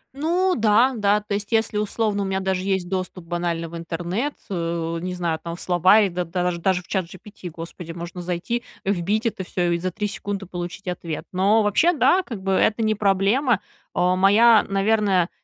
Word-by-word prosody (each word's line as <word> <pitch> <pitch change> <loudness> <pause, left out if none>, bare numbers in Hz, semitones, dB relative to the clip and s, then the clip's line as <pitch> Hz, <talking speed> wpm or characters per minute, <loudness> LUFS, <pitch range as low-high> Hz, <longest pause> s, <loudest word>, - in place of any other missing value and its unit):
Ну 350 +6 +1
да, 230 +4 +4
да, 210 -1 +2
то 210 0 -5
есть, 200 +1 -3
если, 220 -2 +1
условно, 210 -1 -1
у - - -1
меня 190 0 -1
даже 190 -1 -1
есть 190 -2 -1
доступ 185 -1 -4
банально 170 -1 -2
в 170 - -10
интернет, 175 - -3
э, 170 -2 -2
не 180 +1 -4
знаю, 170 -3 -2
там, 170 0 -5
в - - -10
слова 185 +4 +5
и 200 - +2
даж 180 0 -2
даже 180 0 +1
в - - -22
ChatGPT, 185 0 -5
господи, 165 +1 -8
можно 175 +1 -7
зайти, 180 +7 -2 0.2
вбить 200 +4 0
это 210 -4 -1
всё 175 -1 -1
и 170 - 0
за 185 - -2
3 210 +3 -3
секунды 200 -1 -5
получить 175 +1 -7
ответ. 170 -3 -4
Но 200 +4 +3
вообще, 315 - +3
да, 360 +4 +4
как 230 - -8
бы, 195 - 0
это 215 +4 +2
не 215 0 +2
проблема. 205 +4 +2 0.4
Э, 180 +1 +3
моя, 210 +4 +6
наверное, 195 -3 +2
190 Hz, 190 wpm, -23 LUFS, 175-210 Hz, 0.4 s, моя